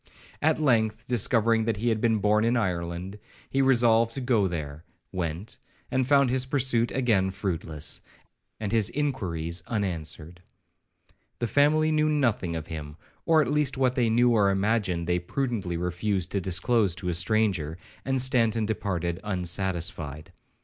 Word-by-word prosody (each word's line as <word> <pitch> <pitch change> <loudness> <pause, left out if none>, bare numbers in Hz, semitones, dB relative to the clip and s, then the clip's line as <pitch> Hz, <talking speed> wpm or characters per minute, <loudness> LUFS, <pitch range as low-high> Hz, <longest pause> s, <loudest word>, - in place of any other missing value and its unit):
At 155 +1 +2
length, 115 -6 +1
discovering 115 -1 +2
that 110 -3 -1
he 120 +4 0
had 110 -2 0
been 115 -1 +2
born 105 +1 +2
in 120 +2 +2
Ireland, 90 -1 -3 0.3
he 135 - +2
resolved 115 -3 +3
to - - -3
go 120 -6 +2
there,—went, 85 +3 -6 0.3
and 130 -1 +1
found 140 -2 +4
his 130 0 0
pursuit 130 -4 +2
again 110 -8 +1
fruitless, 85 -6 -3 0.6
and 105 -2 -3
his 110 -2 +2
inquiries 90 - -2
unanswered. 85 -5 -4 1.0
The 120 - -1
family 150 +5 +3
knew 155 0 +2
nothing 115 - 0
of 80 -1 -5
him, 75 -2 -7 0.3
or 160 -2 +5
at - - -3
least 145 -2 +1
what 130 -2 +2
they 120 -3 +1
knew 120 +2 +4
or 105 -4 +3
imagined, 95 -3 0
they 90 +1 +1
prudently 100 -3 -3
refused 90 +1 -2
to 100 - -1
disclose 95 +2 +1
to 90 -1 -4
a - - 0
stranger, 90 -4 +1 0.3
and 135 0 0
Stanton 115 -4 +2
departed 90 -5 -2
unsatisfied. 90 -5 -2
105 Hz, 150 wpm, -26 LUFS, 90-120 Hz, 1.0 s, or